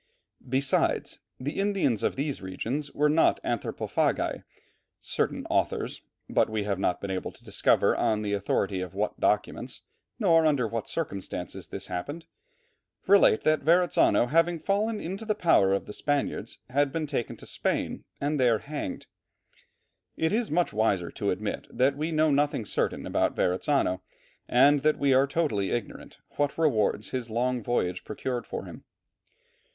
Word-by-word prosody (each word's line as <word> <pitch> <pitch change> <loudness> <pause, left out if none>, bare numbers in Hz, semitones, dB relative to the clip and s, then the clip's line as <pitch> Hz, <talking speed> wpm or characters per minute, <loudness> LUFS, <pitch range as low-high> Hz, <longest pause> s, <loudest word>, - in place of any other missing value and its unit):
Besides, 135 +1 +1 0.2
the 140 +7 -4
Indians 195 - +1
of - - 0
these 140 0 -2
regions 115 +10 -4
were 150 +1 +2
not 155 +2 +3
anthropophagi. - - -1 0.6
Certain - - -2
authors, - - -1 0.3
but - - +2
we 110 -1 -1
have 100 -2 -2
not 90 - 0
been 100 - -4
able 95 -1 -3
to - - -21
discover - - +2
on 105 -1 +1
the 105 -1 -1
authority 100 -1 0
of 90 -1 -6
what 105 +1 -2
documents, 120 +4 -1 0.3
nor 165 -8 +4
under 140 -6 +2
what 115 0 -4
circumstances 95 - -4
this - - -6
happened, 145 - -5 0.8
relate 195 - +5
that 155 -1 +2
Verrazzano 170 -4 +4
having 165 +5 +2
fallen 210 +5 0
into 190 +6 -5
the 215 -1 0
power 165 - +4
of 100 - 0
the 105 - -8
Spaniards, 145 +2 -2
had 140 +1 +2
been 160 +1 -2
taken 140 -5 -3
to - - -11
Spain - - -2 0.2
and 145 +1 -1
there 120 -3 +4
hanged. 145 -6 -5 1.1
It 160 +3 +1
is 230 +1 0
wiser 110 - +1
to - - -2
admit - - -3
that 130 +3 +2
we 155 +3 -2
know 155 -1 +3
nothing 145 -5 +1
certain - - -1
about - - 0
Verrazzano, 95 0 +1 0.5
and 140 +4 +5
that 155 +2 +2
we 140 -1 +3
are 135 +2 +4
totally 135 -11 0
ignorant 120 -3 -5 0.2
what 145 -1 0
rewards 110 -9 +1
his 125 -2 -3
long 125 +2 0
voyage 90 -6 -1
procured 120 +2 -4
for - - -5
him. - - -11
135 Hz, 155 wpm, -27 LUFS, 105-155 Hz, 1.1 s, relate